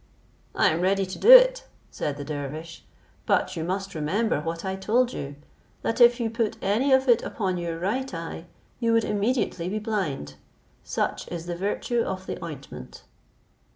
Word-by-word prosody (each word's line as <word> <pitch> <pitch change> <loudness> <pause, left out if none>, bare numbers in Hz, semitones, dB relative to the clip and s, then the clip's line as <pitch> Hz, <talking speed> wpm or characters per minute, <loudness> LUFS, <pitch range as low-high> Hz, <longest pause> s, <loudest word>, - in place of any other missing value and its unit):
"I - - +4
am 160 +2 -1
ready 195 +1 +2
to 185 - -8
do 450 - +3
it," - - +8 0.3
said 145 -1 -3
the 145 - -5
dervish; 155 +3 -6 0.4
"but 185 - +1
you 160 - -3
must 195 +3 -3
remember 160 +4 0
what 165 +2 -4
I 190 0 -2
told 240 +6 +1
you, 140 0 -6 0.5
that 230 +2 -1
if 240 +1 +7
you 235 - 0
put 225 -1 -2
any 220 +8 +1
of 265 0 +4
it 240 -2 +5
upon 185 -4 -2
your 170 -1 -3
right 230 +10 -2
eye, 165 -1 -6 0.3
you 230 -2 +1
would 230 -1 +3
immediately 205 -4 -1
be 210 - -2
blind; 185 - -3 0.5
such - - -2
is 170 -1 -6
the 175 0 -4
virtue 205 +6 -1
of 190 -3 -4
the - - -6
ointment." 150 -5 -9
190 Hz, 175 wpm, -25 LUFS, 165-230 Hz, 0.5 s, it